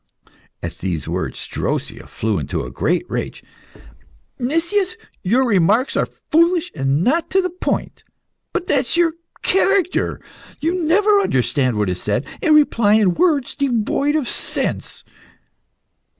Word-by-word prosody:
At - - -6
these 85 -4 -3
words - - -3
Drosea - - -3
flew 110 -4 -2
into 70 - -3
a - - -7
great - - 0
rage. - - -4 1.0
"Nicias, 340 - 0 0.2
your 240 +8 +2
remarks 210 +5 +2
are - - +1
foolish 335 +1 +1
and 135 +2 0
not 320 - +1
to 385 - +2
the 365 -2 0
point. 360 - -3 0.5
But 360 0 -2
that 270 -4 +1
is 280 - -1
your 340 -2 +3 0.3
character 385 -1 +1 0.4
you 325 +4 0
never 405 +6 +4
understand 130 - +1
what 105 -1 +1
is 90 -1 -3
said, 105 +6 -1 0.2
and 310 -2 +4
reply 230 -8 +4
in 205 -5 +3
words 295 - +1
devoid 275 +2 0
of 295 -5 0
sense." - - -2
280 Hz, 135 wpm, -20 LUFS, -, 1.0 s, never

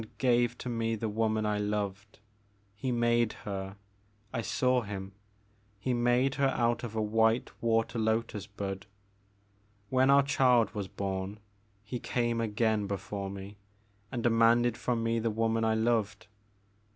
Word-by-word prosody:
He - - -6
made - - -19
and - - -32
gave 120 -2 +2
to - - -7
me 115 -1 -1
the 110 0 -3
woman 110 0 0
I 105 0 0
loved, 105 -1 -3 0.3
— 100 0 -38
he 125 +5 -3
made 120 -1 +2
her, 95 -1 -4 0.3
— 105 +1 -37
I 115 - -1
saw 125 +4 +1
him, 100 -3 -6 0.3
— 105 0 -37
he 125 +5 -1
made 120 +2 +2
her 135 - +5
out 120 -2 +1
of 115 -2 -5
a 110 - 0
white 110 +2 +2
water 115 0 +1
lotus 110 -2 -1
bud. 100 -1 -5 1.0
When 130 +2 +3
our 140 0 +6
child 125 -4 +3
was 100 -2 -4
bom, 95 +1 -4 0.5
he 115 +4 -5
came 120 -1 -1
again 110 -1 +1
before 100 0 -4
me 100 +1 -8 0.5
and 120 -3 -3
demanded 115 0 +4
from 120 -2 -1
me 115 0 +1
the 115 0 0
woman 115 +1 0
I 110 0 +2
loved. 110 -2 0
110 Hz, 165 wpm, -30 LUFS, 105-120 Hz, 1.0 s, our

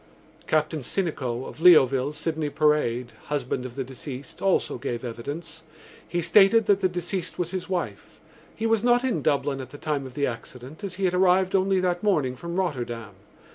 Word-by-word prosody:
Captain 155 0 +1
Sinico, 130 -5 -2
of - - -10
Leoville, 140 -6 +6
Sydney 155 0 -2
Parade, 145 -5 +1
husband 130 -3 -2
of 120 - -12
the 135 - -2
deceased, 130 +1 -8
also 195 -9 +1
gave 120 -2 -4
evidence. 145 +8 -6 0.5
He 175 - -1
stated 205 +6 +5
that 200 -1 +3
the 185 - +3
deceased 175 +1 -4
was 175 -1 -2
his 185 -1 -4
wife. 185 -2 -4 0.4
He 225 - -3
was 225 -1 +2
not 245 +1 +4
in 245 - 0
Dublin 140 0 0
at 130 - -9
the 145 - -10
time 145 -3 -2
of 130 - -13
the 140 - +1
accident 125 - -7
as 195 -2 -4
he 195 +1 -1
had 180 - +1
arrived 185 0 +3
only 190 0 +3
that 180 -1 0
morning 150 -12 +1
from 170 +6 -6
Rotterdam. 120 - -2
155 Hz, 180 wpm, -25 LUFS, 130-185 Hz, 0.5 s, Leoville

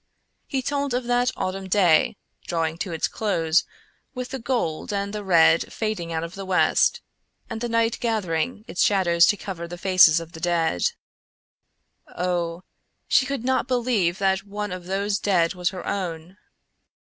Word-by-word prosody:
He 265 -2 -2
told 280 -2 -1
of 250 - -1
that 245 +1 +1
autumn 190 0 -3
day 185 +1 +3 0.3
drawing 165 -1 -1
to 190 -3 -3
its 165 - -1
close, 170 -6 +1 0.5
with 250 0 -5
the 265 - -5
gold 225 -12 -2
and 200 0 -2
the 210 -1 -4
red 165 -3 +4
fading 215 -7 -3
out 160 0 -2
of 170 +1 -6
the 195 - -7
west, 190 - +2 0.5
and 225 0 -5
the 240 - -2
night 230 0 +1
gathering 215 -1 -2
its - - 0
shadows 175 -4 +4
to 205 - +2
cover 175 -5 -6
the 175 +1 -8
faces 180 -3 +5
of 165 0 -9
the 165 - -10
dead. 165 - 0 1.1
Oh! 175 -1 -2 0.4
She 260 - +3
could 275 -4 -3
not 260 -1 +1
believe 235 -8 +1
that 195 0 +1
one 205 0 -5
of 180 -1 -6
those 200 +1 -1
dead 175 -4 +2
was 180 -1 -1
her 185 -2 -8
own! 180 -2 -4
190 Hz, 165 wpm, -24 LUFS, 170-225 Hz, 1.1 s, faces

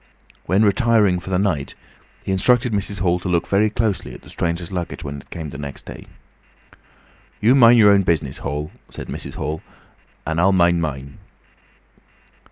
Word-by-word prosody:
When 95 +5 +3
retiring 105 -3 +3
for 90 - -10
the 95 - +1
night 90 -8 -1 0.5
he - - -3
instructed 120 +5 +2
Mrs. 100 0 -2
Hall 90 -1 +2
to 90 - -5
look 85 -1 +1
very 105 +2 +2
closely 105 -3 -2
at - - -13
the - - -13
stranger's 85 +1 -3
luggage 90 -2 -5
when 70 -1 -6
it - - -26
came 80 -2 -6
next 70 0 -8
day. - - -10 1.3
"You 115 +4 +4
mind 120 -3 +7
your 105 -3 +7
own 100 -1 +5
business, 80 -7 -1
Hall," 75 +2 -4 0.2
said - - -9
Mrs. - - -6
Hall, 75 +3 -4 0.6
"and 80 +2 0
I'll 95 +2 +4
mind 85 -2 +3
mine." 70 -3 -5
90 Hz, 170 wpm, -21 LUFS, 80-105 Hz, 1.3 s, mind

